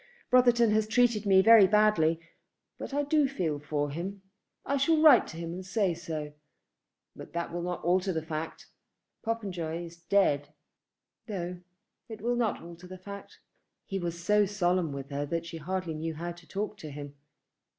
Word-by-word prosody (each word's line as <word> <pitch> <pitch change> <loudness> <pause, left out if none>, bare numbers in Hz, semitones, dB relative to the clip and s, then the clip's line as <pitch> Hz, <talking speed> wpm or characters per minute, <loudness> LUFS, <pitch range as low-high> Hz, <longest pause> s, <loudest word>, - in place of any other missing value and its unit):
Brotherton 240 -3 +5
has 215 0 +2
treated 230 -2 +2
me 190 -1 +6
very 225 -2 +8
badly, 200 -6 +3 0.6
but - - -6
I 290 +1 0
do 290 0 +3
feel 170 - -2
for 145 -1 -2
him. 190 +6 -5 0.4
I 280 - 0
shall 310 +3 +3
write 305 -6 +7
to 160 - -9
him 165 0 -5
and 185 +2 -6
say 190 -1 0
so. 160 -3 -5 0.8
But - - -11
that 170 0 -3
will 175 - -3
not 180 0 -4
alter 185 +2 +2
the 160 -2 -3
fact. 160 0 -5 0.6
Popenjoy 180 -7 -3
is 170 0 -12
dead." 150 -6 +1 0.7
"No; 180 -4 -4 0.5
it 220 -1 -7
will 240 +3 0
not 235 -7 -1
alter 170 +1 -11
the 185 +1 -9
fact." 200 +2 -10 0.5
He 195 - -3
was 170 -1 -4
so 210 +1 +3
solemn 180 -4 0
with 140 0 -7
her 145 +1 -2
that 165 +2 -2
she 165 0 -7
hardly 180 +1 -3
knew 160 +1 -4
how 170 +3 -4
to 170 -1 -14
talk 210 +1 -4
to 155 - -8
him. 145 0 -8
180 Hz, 175 wpm, -29 LUFS, 165-210 Hz, 0.8 s, very